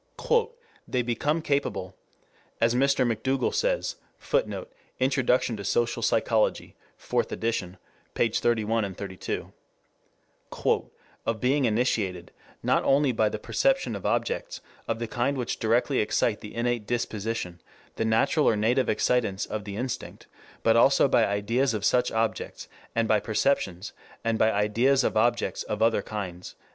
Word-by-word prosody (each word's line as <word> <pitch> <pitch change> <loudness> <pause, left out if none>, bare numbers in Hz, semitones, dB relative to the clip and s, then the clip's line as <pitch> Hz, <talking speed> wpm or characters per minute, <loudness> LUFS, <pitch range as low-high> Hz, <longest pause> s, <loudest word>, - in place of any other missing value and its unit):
"They 125 -1 0
become 145 +7 -1
capable," 100 - -1 0.6
as 115 0 +3
Mr. 135 +1 +3
McDougall 125 +3 0
says, - - 0 0.2
[Footnote: - - -2 0.3
Introduction 130 -2 +2
to 100 - -6
Social 115 +4 0
Psychology, 110 0 +1 0.2
Fourth - - -1
Edition, 100 -5 -2 0.4
pp. 115 -1 +1
31 110 -4 +1
32.] 95 -1 -5 1.7
"of 115 -1 0
being 135 +3 +2
initiated, 105 -6 0 0.3
not - - +2
only 140 0 +3
by 110 -2 +2
the 110 - -4
perception 265 - +1
of 100 - -7
objects - - -1 0.3
of 115 - -1
the 115 0 -4
kind 125 +5 -1
which 125 -3 -3
directly 120 +4 +2
excite 105 +1 +1
the 105 - -10
innate 120 -2 -1
disposition, 110 -6 -3 0.4
the - - 0
natural 115 +7 +3
or 110 - +2
native 120 +5 +2
excitants 110 -6 +1
of 105 -1 -5
the 100 -1 -6
instinct, 125 +3 -5 0.4
but 115 - +4
also 135 +4 +5
by 120 -4 +3
ideas 115 +5 0
of 105 -1 -2
such 125 +2 +2
objects, 110 0 -2 0.3
and 115 -1 +2
by 110 0 +3
perceptions 105 -4 -1 0.3
and 115 -1 0
by 110 - +4
ideas 115 +7 +2
of - - 0
objects 120 +2 +1
of 105 0 -2
other 115 -2 +3
kinds." 95 -4 -6
115 Hz, 140 wpm, -27 LUFS, 105-125 Hz, 1.7 s, also